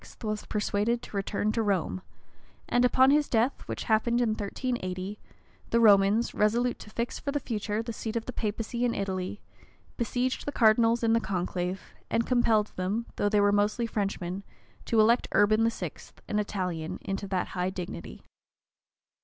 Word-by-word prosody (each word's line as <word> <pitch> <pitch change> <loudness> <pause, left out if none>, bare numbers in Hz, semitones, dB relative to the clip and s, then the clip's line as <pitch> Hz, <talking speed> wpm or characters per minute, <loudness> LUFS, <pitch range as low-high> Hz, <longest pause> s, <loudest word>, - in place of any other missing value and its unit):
was 215 -1 -3
persuaded 210 +3 0
to - - -10
return 200 +1 0
to 225 - 0
Rome; 195 -3 0 0.7
and 245 - +2
upon 260 +2 +5
his 295 0 +3
death, 235 +4 +1
which - - -4
happened 235 +2 +2
in 240 -2 +2
1380, 205 -3 -3 0.5
the 235 - +3
Romans, 205 +1 +5
resolute 235 +4 +1
to - - -11
fix, 235 +2 -3
for 280 - -3
the 290 - 0
future, 215 -3 -2
the 230 0 -5
seat 220 +1 -5
of 230 - -2
the 255 - -5
papacy 225 +2 -2
in 240 -1 +1
Italy, 190 0 -3 0.6
besieged 250 +2 -1
the - - 0
cardinals 230 -1 +4
in 225 0 +3
the 230 - +4
conclave, 180 -1 -3 0.2
and 230 - +1
compelled 225 -4 +2
them, 200 +6 -1
though 205 - +2
they 205 -1 +3
were 205 0 +4
mostly 205 +3 +1
Frenchmen, 195 -4 -3 0.4
to 225 - +2
elect 230 +3 +4
Urban 215 +2 +4
VI., 230 - -4 0.4
an 210 - 0
Italian, 180 -6 -3
into 195 +1 -3
that 190 -2 -1
high 180 0 -1
dignity. 175 - -7
215 Hz, 165 wpm, -28 LUFS, 195-235 Hz, 0.7 s, upon